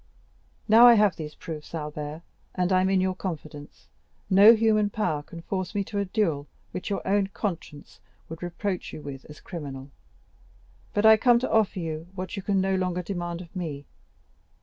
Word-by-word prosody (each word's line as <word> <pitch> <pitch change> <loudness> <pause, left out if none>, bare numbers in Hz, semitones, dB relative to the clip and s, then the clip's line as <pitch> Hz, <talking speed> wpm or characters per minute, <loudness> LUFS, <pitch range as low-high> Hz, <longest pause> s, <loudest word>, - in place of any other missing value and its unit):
Now 230 +3 +8
I 240 - +8
have 210 -3 +3
these 150 -1 -7
proofs, 160 -1 -8
Albert, 150 0 -6 0.3
and 180 0 0
I 185 - +4
am 190 - +1
in 190 -1 +3
your 185 0 +1
confidence, 155 -5 -8 0.4
no 205 +5 +8
human 215 -2 +2
power 160 -8 -1
can 165 +3 -11
force 190 +2 -4
me 200 - +1
to 200 +1 -4
a 200 - 0
duel 170 -8 -1 0.2
which 180 - -5
your 200 - -3
own 200 0 +2
conscience 170 -7 -6 0.3
would 165 0 -9
reproach 180 +2 -4
you 150 - -8
with 135 -2 -8
as 150 - -12
criminal, 140 -5 -8 1.0
but 205 +1 +2
I 220 0 +8
come 240 +2 +5
to 245 - -2
offer 215 -2 +2
you 165 -1 -4
what 185 +1 -5
you 195 - -4
can 195 0 0
no 190 0 +1
longer 180 -1 -1
demand 175 -2 -4
of 175 +2 -14
me. 150 -6 -5
185 Hz, 185 wpm, -26 LUFS, 155-205 Hz, 1.0 s, Now